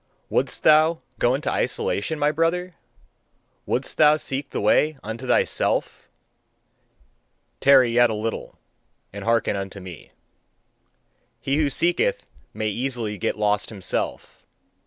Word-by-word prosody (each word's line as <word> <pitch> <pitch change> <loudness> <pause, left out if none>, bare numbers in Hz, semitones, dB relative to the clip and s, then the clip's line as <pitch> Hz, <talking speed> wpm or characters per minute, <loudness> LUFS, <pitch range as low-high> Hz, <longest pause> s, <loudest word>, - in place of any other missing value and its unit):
Wouldst - - -1
thou 155 +2 +5 0.2
go 120 +2 +3
into 145 - -2
isolation, 100 +11 -1
my 150 0 +2
brother? 170 +3 -1 0.9
Wouldst - - -2
thou 150 0 +6
seek 140 -1 -4
the - - -4
way 150 +8 +2
unto 115 +4 -6
thyself? - - 0 1.5
Tarry 130 -3 +5
yet 120 0 +4
a 110 - -2
little 110 +1 -5 0.6
and 100 -1 -7
hearken 115 -1 +1
unto 100 0 -5
me. 90 -3 -11 1.3
"He 135 +1 -1
who 150 -2 +2
seeketh 175 - 0 0.3
may 110 0 -2
easily 115 -3 -3
get - - -1
lost 105 -1 0
himself. 100 -5 -4
130 Hz, 120 wpm, -23 LUFS, 105-155 Hz, 1.5 s, thou